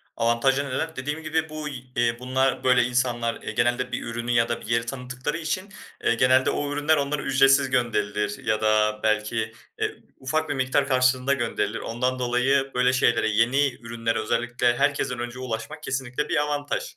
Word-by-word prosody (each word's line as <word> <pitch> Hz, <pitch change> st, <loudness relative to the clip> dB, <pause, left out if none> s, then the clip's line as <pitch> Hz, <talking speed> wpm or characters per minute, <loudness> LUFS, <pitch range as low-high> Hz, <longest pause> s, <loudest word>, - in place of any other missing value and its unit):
Avantajları 135 Hz, +4 st, +1 dB
neler? 160 Hz, +5 st, -3 dB
Dediğim 150 Hz, +4 st, -4 dB
gibi 160 Hz, +1 st, -1 dB
bu 155 Hz, 0 st, -5 dB
y 135 Hz, -4 st, -6 dB
eee, 120 Hz, -1 st, +1 dB
bunlar, 130 Hz, +1 st, 0 dB
böyle 125 Hz, -1 st, +5 dB
insanlar, 120 Hz, -1 st, -1 dB
eee, -, -, -5 dB
genelde 120 Hz, +1 st, 0 dB
bir 125 Hz, -, -3 dB
ürünü 120 Hz, +1 st, -4 dB
ya 120 Hz, -1 st, +3 dB
da 120 Hz, -, -2 dB
bir -, -, -11 dB
yeri 115 Hz, 0 st, +1 dB
tanıttıkları 125 Hz, +3 st, -4 dB
için, 170 Hz, +5 st, -3 dB, 0.3 s
eee, -, -, +3 dB
genelde 130 Hz, +2 st, +4 dB
o 145 Hz, 0 st, -2 dB
ürünler 150 Hz, +2 st, +2 dB
onlara 140 Hz, 0 st, -1 dB
ücretsiz 135 Hz, 0 st, +4 dB
gönderilir 105 Hz, -4 st, -1 dB
ya 110 Hz, -2 st, +1 dB
da 105 Hz, 0 st, +2 dB
belki, 110 Hz, +1 st, 0 dB, 0.3 s
eee, -, -, -1 dB, 0.2 s
ufak 155 Hz, +4 st, -1 dB
bir -, -, 0 dB
miktar 135 Hz, +1 st, +1 dB
karşılığında 130 Hz, 0 st, +2 dB
gönderilir. 125 Hz, -4 st, -1 dB
Ondan 125 Hz, +2 st, -2 dB
dolayı 130 Hz, +3 st, +1 dB
böyle 125 Hz, 0 st, +3 dB
şeylere, 115 Hz, -3 st, +2 dB
yeni 125 Hz, +6 st, +2 dB
ürünlere 115 Hz, -1 st, -2 dB
özellikle 120 Hz, +2 st, 0 dB
herkesten 140 Hz, -3 st, 0 dB
önce 120 Hz, +1 st, -5 dB
ulaşmak 125 Hz, +4 st, -5 dB
kesinlikle 130 Hz, +1 st, -3 dB
bir -, -, +1 dB
avantaj. 145 Hz, -, -2 dB
125 Hz, 175 wpm, -25 LUFS, 115-140 Hz, 0.3 s, böyle